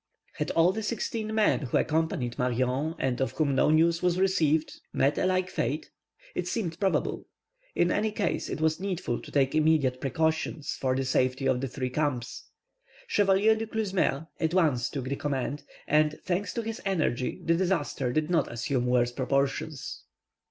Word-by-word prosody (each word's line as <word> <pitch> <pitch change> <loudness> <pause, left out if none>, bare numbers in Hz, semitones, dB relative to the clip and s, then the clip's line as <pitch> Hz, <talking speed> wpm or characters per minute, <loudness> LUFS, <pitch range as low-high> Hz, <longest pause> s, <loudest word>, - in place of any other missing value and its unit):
Had - - -2
all 170 +2 +5
the 220 - -4
sixteen 220 0 -3
men 215 -1 +3
who 130 -5 -1
accompanied 155 -6 0
Marion, 125 +5 0
and 130 -1 -1
of 130 - 0
whom 150 -3 +1
no 135 - +3
news 165 +2 +3
was 180 -1 +2
received, 160 -5 +1
met 140 +2 +2
a - - +2
like 185 0 +1
fate? 145 +6 -2 0.4
It 180 - -3
seemed 180 -5 -3
probable. 195 -2 0 0.5
In 175 - +3
any 215 +1 +1
case, - - -1
it - - -3
was 160 +1 +1
needful 185 -10 -2
to - - -11
take 135 -2 +2
immediate 155 -5 +2
precautions 160 +2 -1
for 130 -1 -1
the 135 0 -1
safety 130 +1 +1
of 125 - +1
the 135 - -1
three 130 0 -4
camps. 130 -4 -2 0.6
Chevalier 205 - +3
Du 220 0 -4
Clesmeur 190 -9 0
at 160 +1 0
once 140 -9 +2
took 135 -4 -4
the 135 +2 -2
command, 140 0 -2 0.3
and, 150 0 +2
thanks 185 +3 -1
to 235 - -1
his 225 0 -5
energy, 155 - -1
the 165 - +3
disaster 165 -8 0
did 155 +3 0
not 165 -5 +2
assume 120 +1 -1
worse 120 -1 +2
proportions. 135 +3 -2
155 Hz, 175 wpm, -28 LUFS, 130-180 Hz, 0.6 s, all